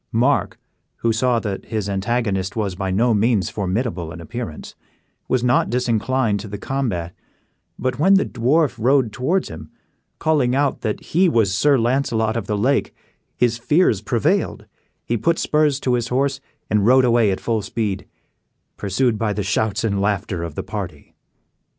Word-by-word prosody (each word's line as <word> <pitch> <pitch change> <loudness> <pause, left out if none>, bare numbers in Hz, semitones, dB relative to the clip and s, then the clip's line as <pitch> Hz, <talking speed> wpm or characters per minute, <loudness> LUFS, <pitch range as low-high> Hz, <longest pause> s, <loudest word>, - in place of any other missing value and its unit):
Mark, 125 +6 +1 0.4
who 115 -1 0
saw 120 +1 +2
that 100 -3 -4
his 110 -3 -3
antagonist 100 -1 -1
was 105 -4 -1
by 95 +1 -3
no 115 +6 +2
means 105 -2 +1
formidable 95 -4 -2
in 90 - -9
appearance, 110 -3 -7 0.5
was 130 -2 +1
not 125 0 +2
disinclined 120 -2 0
to 105 - -7
the 105 +1 -6
combat; 100 -9 -3 0.6
but 130 0 -2
when 190 +6 +5
the 195 - +3
dwarf 130 +3 +1
rode 125 0 +3
towards 175 +10 0
him, 80 -1 -9 0.5
calling 140 -6 +1
out 140 0 0
that 110 -2 -2
he 180 +3 +2
was 110 - +2
Sir 140 +7 +3
Launcelot 115 -2 +1
of 115 -4 -3
the 105 - -1
Lake, 130 +7 +1 0.4
his 120 -1 +1
fears 135 - +2
prevailed, 110 +1 0 0.4
he 120 - 0
put 165 +8 +1
spurs 150 -2 +2
to 125 - +1
his 120 -1 0
horse, 135 +2 0 0.3
and 105 -1 +2
rode 130 +1 +6
away 120 -3 +3
at 95 - -1
full 115 -2 -1
speed, 100 -1 -3 0.7
pursued 110 +3 0
by 110 -2 0
the 105 - -2
shouts 105 +3 0
and 100 -3 0
laughter 100 -3 -1
of 85 -3 -5
the - - -3
party. - - -7
115 Hz, 165 wpm, -21 LUFS, 100-130 Hz, 0.7 s, rode